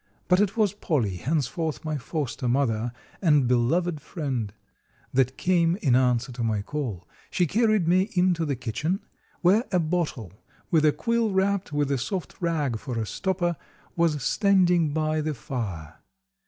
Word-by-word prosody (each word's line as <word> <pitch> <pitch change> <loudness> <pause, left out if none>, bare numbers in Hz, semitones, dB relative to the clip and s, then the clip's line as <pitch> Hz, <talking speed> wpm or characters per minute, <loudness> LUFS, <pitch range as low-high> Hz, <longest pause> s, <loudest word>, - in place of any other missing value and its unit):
But 180 0 +4
it 205 +2 0
was 210 -3 +3
Polly, 125 - -1
henceforth 155 - -2
my 155 -1 -1
foster 135 -3 -3
mother 120 -3 +1 0.3
and 150 -8 +4
beloved 150 +7 +1
friend, 130 - -3 0.6
that 130 0 +2
came 175 -2 +2
in 140 - +2
answer 125 -1 +2
to 120 -1 -4
my 110 -3 0
call. 110 - -4 0.2
She 180 - +1
carried 215 -1 +2
me 185 +4 +3
into 180 -2 +2
the 145 -3 -1
kitchen, 150 - -2 0.4
where 200 +7 +4
a 180 - +3
bottle, 155 - -2 0.4
with 155 -2 +4
a 150 - +6
quill 230 +4 0
wrapped 195 -2 0
with 145 -1 0
a 135 - +1
soft 175 +8 -4
rag 150 -9 0
for 125 -2 -5
a 110 - -1
stopper, 175 - -1 0.4
was 160 -5 +1
standing 180 - +3
by 155 0 0
the 155 -1 -2
fire. 105 - -5
155 Hz, 155 wpm, -26 LUFS, 125-180 Hz, 0.6 s, a